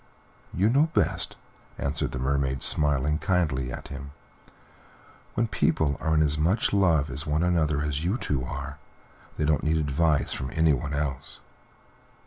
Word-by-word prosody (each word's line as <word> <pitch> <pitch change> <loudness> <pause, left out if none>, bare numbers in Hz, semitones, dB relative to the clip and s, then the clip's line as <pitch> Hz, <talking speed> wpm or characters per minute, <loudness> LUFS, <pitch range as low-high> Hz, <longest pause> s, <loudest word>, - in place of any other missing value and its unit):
"You 95 +4 +1
know 140 +7 +3
best," - - +1 0.4
answered 70 +2 -2
the - - -4
Mermaid, 65 0 -1
smiling 75 +1 +2
kindly 75 -10 0
at - - -8
him. 70 0 -8 1.2
"When 115 - +2
people 80 -8 +1
are 80 -1 0
as 75 0 +1
much 90 +10 +1
in 100 - +3
love 80 -6 +3
with 75 +2 -2
one 75 +2 +1
another 80 -4 +1
as 75 0 -2
you 95 +7 0
two 70 - -2
are, 70 +2 -6 0.6
they 75 - 0
don't 75 -2 +2
need 80 +1 +2
advice 75 0 +1
from 65 - -4
anyone 75 -3 +1
else." 70 -3 -4
75 Hz, 150 wpm, -26 LUFS, 70-80 Hz, 1.2 s, know